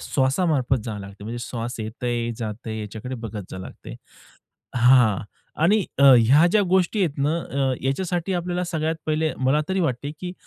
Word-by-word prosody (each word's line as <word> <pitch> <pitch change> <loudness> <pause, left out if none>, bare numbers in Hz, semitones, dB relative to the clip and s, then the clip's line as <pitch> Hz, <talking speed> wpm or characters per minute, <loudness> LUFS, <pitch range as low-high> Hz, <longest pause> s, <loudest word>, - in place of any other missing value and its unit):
श्वासामार्फत 135 -1 +1
जावं 110 -3 -5
लागते, 100 +1 -10
म्हणजे 120 +2 -5
श्वास 120 0 -5
येतय 120 +2 -3
जातंय 110 0 -5
याच्याकडे 110 +5 -6
बघत 110 -3 -6
जावं 95 - -6
लागत. - - -11 0.9
हां. 120 -4 +5 0.4
आणि 200 +4 +4
अ, - - +3 0.2
ह्या 135 +8 +5
ज्या 215 - +4
गोष्टी 190 +3 +2
आहेत 150 -4 -4
ना, 150 +4 +1
अ, 135 -4 -1
ह्याच्यासाठी 175 +7 -1
आपल्याला 180 +1 -2
सगळ्यात 160 -2 -2
पहिले 155 0 0
मला 130 +3 +2
तरी 190 0 0
वाटते, 145 -3 -1
की 180 -1 -5
135 Hz, 160 wpm, -23 LUFS, 115-165 Hz, 0.9 s, हां